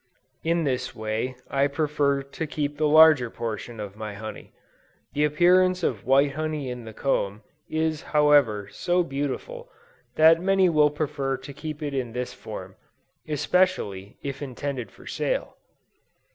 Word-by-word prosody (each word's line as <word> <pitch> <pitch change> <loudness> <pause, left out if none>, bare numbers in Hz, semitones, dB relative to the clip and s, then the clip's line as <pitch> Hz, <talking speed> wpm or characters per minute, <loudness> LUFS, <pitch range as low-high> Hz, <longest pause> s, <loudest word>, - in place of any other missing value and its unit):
In 170 +1 +1
this 130 -4 -2
way, 110 +3 -3
I 140 0 +2
prefer 145 -1 0
to 140 +3 -5
keep 145 -1 -2
the 155 0 +2
larger 155 -5 +7
portion 115 0 -5
of 100 -1 -6
my 110 -1 -6
honey. 110 +1 -8 0.6
The 150 +1 +2
appearance 180 +4 +4
of 110 -10 -1
white 140 +2 +4
honey 155 -2 -3
in 125 -2 -7
the 110 - -8
comb, 105 -5 -1 0.3
is 155 -1 -1
however, 145 -9 +3
so 180 0 +1
beautiful, 170 - -4 0.5
that 160 +1 +6
many 190 0 +3
will 150 -2 +4
prefer 145 -2 -2
to 135 +2 -10
keep 155 +1 -6
it 145 -1 -3
in 125 -4 -3
this 125 0 -4
form, - - -9 0.5
especially, 150 - 0
if 140 0 -5
intended 135 -2 -4
for - - -17
sale. - - -2
145 Hz, 145 wpm, -25 LUFS, 125-155 Hz, 0.6 s, larger